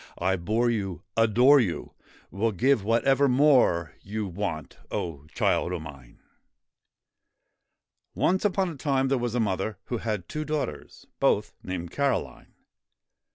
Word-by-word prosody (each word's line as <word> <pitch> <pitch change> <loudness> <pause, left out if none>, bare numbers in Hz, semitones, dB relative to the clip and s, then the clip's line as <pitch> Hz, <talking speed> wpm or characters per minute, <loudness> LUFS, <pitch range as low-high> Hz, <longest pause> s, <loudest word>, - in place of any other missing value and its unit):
I 95 +2 +1
bore 110 +7 0
you, 95 -7 -3
adore 120 +6 +5
you, 95 -9 -2 0.4
Will 110 +3 0
give 120 +4 +2
whatever 130 +6 +3
more 125 - +3
you 105 +2 -4
Want, 90 -5 -5
O 75 -4 -4
child 85 - 0
d - - -1
mine 70 -6 -12 0.6
> - - -55
ONCE 185 +2 +1
upon 195 -2 +1
a 165 - -7
time 135 -2 0
there 135 -1 +1
was 120 -1 -2
a - - +1
mother 100 -1 -1
who 120 - -3
had 105 -6 -3
two 155 - -4
daughters, 150 - -4
both - - +2
named 90 -2 -5
Caroline. 140 -1 -2
110 Hz, 140 wpm, -26 LUFS, 90-135 Hz, 0.6 s, adore